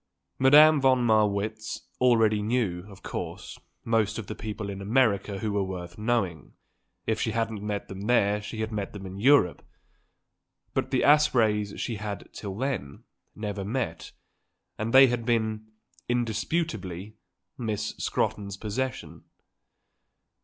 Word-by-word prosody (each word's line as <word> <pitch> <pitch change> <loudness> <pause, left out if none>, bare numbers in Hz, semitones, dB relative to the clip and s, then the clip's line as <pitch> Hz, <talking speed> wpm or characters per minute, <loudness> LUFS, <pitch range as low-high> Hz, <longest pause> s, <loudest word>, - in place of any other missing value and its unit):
Madame 150 +3 +7
von 130 -2 +4
Marwitz 110 0 +1 0.2
already 115 -4 +4
knew, 105 -6 -1
of 95 -2 -14
course, - - -6 0.3
most 110 -2 +1
of 115 - -5
the 110 - -5
people 105 -1 -5
in 100 -1 -6
America 100 -2 +1
who 105 +2 -2
were 100 -1 +1
worth 90 -2 -6
knowing; 100 - -1 0.5
if 110 0 0
she - - 0
hadn't 115 -2 -2
met 105 -1 -3
them 95 0 -8
there 105 -4 +3
she 110 +1 -6
had 110 0 -3
met 105 -2 -4
them 100 -2 -8
in 95 +1 -7
Europe; 120 -7 +4 1.1
but - - -1
the - - +1
Aspreys 110 -9 +3
she 115 - -3
had, 105 0 -5
till 100 -2 -6
then, 120 - -3 0.3
never 105 -2 -4
met, 105 -6 -3 0.6
and 110 +2 -3
they 135 +2 +9
had 120 -2 -1
been, 110 -2 0 0.4
indisputably, 110 - -2 0.5
Miss 110 -4 -2
Scrotton's 100 -2 -2
possession. 125 +6 -4
110 Hz, 135 wpm, -27 LUFS, 100-120 Hz, 1.1 s, they